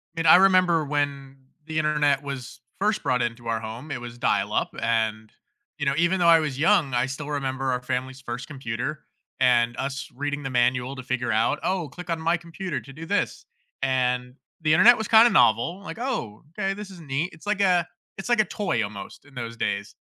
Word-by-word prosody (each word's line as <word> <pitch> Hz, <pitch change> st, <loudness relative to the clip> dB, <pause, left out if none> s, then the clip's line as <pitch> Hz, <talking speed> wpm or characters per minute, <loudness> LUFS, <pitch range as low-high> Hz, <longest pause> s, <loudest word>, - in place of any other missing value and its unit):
And 165 Hz, 0 st, 0 dB
I -, -, +10 dB
remember 185 Hz, -3 st, +4 dB
when 140 Hz, -2 st, -2 dB, 0.3 s
the 160 Hz, 0 st, -4 dB
Internet 150 Hz, -2 st, +2 dB
was 130 Hz, -4 st, -7 dB, 0.2 s
first 210 Hz, +2 st, 0 dB
brought 125 Hz, -1 st, +1 dB
into 120 Hz, 0 st, -3 dB
our 115 Hz, -1 st, 0 dB
home, 115 Hz, +7 st, -8 dB
it 125 Hz, -3 st, -4 dB
was 120 Hz, 0 st, -8 dB
dial-up, -, -, 0 dB
and, 110 Hz, -1 st, -1 dB, 0.5 s
you 145 Hz, -, -3 dB
know, 140 Hz, -, +2 dB
even 170 Hz, +3 st, +2 dB
though 175 Hz, -, +3 dB
I 165 Hz, -1 st, +7 dB
was 150 Hz, -4 st, -3 dB
young, 165 Hz, -5 st, +3 dB
I 120 Hz, +1 st, +2 dB
still 135 Hz, +2 st, -6 dB
remember 135 Hz, -2 st, -2 dB
our 125 Hz, 0 st, -1 dB
family's 130 Hz, +1 st, -4 dB
first 125 Hz, 0 st, -6 dB
computer 130 Hz, +1 st, -5 dB, 0.3 s
and 120 Hz, -1 st, +3 dB
us 135 Hz, +1 st, -4 dB
reading 145 Hz, +2 st, -3 dB
the 135 Hz, -, -3 dB
manual 125 Hz, +1 st, +1 dB
to 130 Hz, -, -8 dB
figure 125 Hz, -1 st, -2 dB
out, 115 Hz, +7 st, +1 dB
"Oh, 180 Hz, -5 st, -1 dB
click 180 Hz, -1 st, -10 dB
on 165 Hz, -1 st, -1 dB
my 165 Hz, +2 st, +1 dB
computer 170 Hz, -1 st, -5 dB
to 135 Hz, -, -13 dB
do 160 Hz, +3 st, -8 dB
this." 205 Hz, +4 st, -1 dB, 0.4 s
And 125 Hz, -1 st, 0 dB, 0.3 s
the 155 Hz, -1 st, +3 dB
Internet 235 Hz, +9 st, +7 dB
was 220 Hz, -, -3 dB
kinda 230 Hz, +1 st, +7 dB
novel, 165 Hz, -, +3 dB
like, 200 Hz, -, -8 dB
"Oh, 230 Hz, -, -4 dB
okay, 195 Hz, +4 st, -2 dB
this 205 Hz, 0 st, -8 dB
is 185 Hz, -2 st, -12 dB
neat." 150 Hz, +2 st, -2 dB
It's 165 Hz, -, -15 dB
like 205 Hz, -1 st, 0 dB
a 180 Hz, -3 st, +3 dB, 0.3 s
it's 195 Hz, -, -6 dB
like 240 Hz, -2 st, +4 dB
a -, -, 0 dB
toy 175 Hz, -, -1 dB
almost 100 Hz, -1 st, -8 dB
in 145 Hz, 0 st, -20 dB
those 115 Hz, -2 st, -6 dB
days, 100 Hz, -3 st, -3 dB
140 Hz, 205 wpm, -25 LUFS, 125-170 Hz, 0.5 s, I